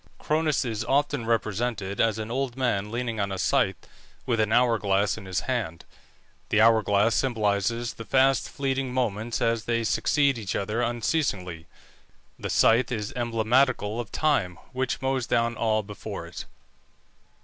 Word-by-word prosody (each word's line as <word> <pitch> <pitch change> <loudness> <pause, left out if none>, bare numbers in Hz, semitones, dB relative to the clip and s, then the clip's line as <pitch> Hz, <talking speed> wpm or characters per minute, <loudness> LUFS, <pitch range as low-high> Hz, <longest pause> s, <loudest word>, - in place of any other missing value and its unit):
Cronus 155 -3 0
is 110 -3 -2
often 145 -3 0
represented 110 -3 -1
as 110 -2 +2
an 110 +1 -5
old 130 0 -2
man 105 -6 0
leaning 115 -1 -3
on 100 -1 -1
a 95 - -3
scythe, - - +2 0.5
with 115 -3 0
an 110 0 +1
hour 120 -1 +3
glass 100 0 +1
in 110 - -10
his 90 -1 -1
hand. 110 -11 -3 0.6
The 110 - +2
hour 110 0 +6
glass 105 +2 +2
symbolizes 115 -1 0
the 115 - -8
fast 135 +2 +2
fleeting 135 -2 -2
moments 115 -2 -1
as 115 -1 0
they 115 -1 0
succeed 140 +3 +2
each 105 -4 -4
other 105 +4 -1
unceasingly; 115 - -1 0.7
the - - -4
scythe 120 +3 +3
is 105 -4 -3
emblematical 120 -1 +1
of 120 -4 -5
time, 130 - +1 0.2
which 130 0 -2
mows 130 -2 0
down 115 0 +1
all 110 -1 +1
before 105 0 -7
it. - - -8
115 Hz, 155 wpm, -26 LUFS, 105-125 Hz, 0.7 s, hour